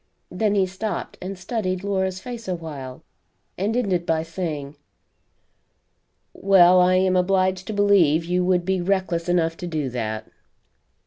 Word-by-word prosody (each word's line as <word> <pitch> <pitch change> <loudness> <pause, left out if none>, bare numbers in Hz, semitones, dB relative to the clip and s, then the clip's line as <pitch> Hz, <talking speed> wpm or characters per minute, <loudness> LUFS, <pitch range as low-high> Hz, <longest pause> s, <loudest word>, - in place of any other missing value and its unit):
Then 205 +3 0
he 195 -2 +3
stopped 190 +1 -5
and 190 +1 -6
studied 185 -1 -3
Laura's 190 -2 -1
face 235 +1 -8
a 185 - -1
while, 140 -6 -8 0.5
and 210 +5 -1
ended 190 -8 0
by 160 -1 0
saying: 160 -4 -5 1.6
"Well, 185 -2 +5
I 180 +1 +4
am 185 0 +2
obliged 185 0 +1
to 220 - -3
believe 190 -6 +3
you 180 +1 0
would 180 -1 +1
be 190 -1 0
reckless 180 -2 -1
enough 165 -2 +1
to 175 - -6
do 155 -6 -3
that." 110 -3 -4
185 Hz, 145 wpm, -23 LUFS, 165-190 Hz, 1.6 s, Well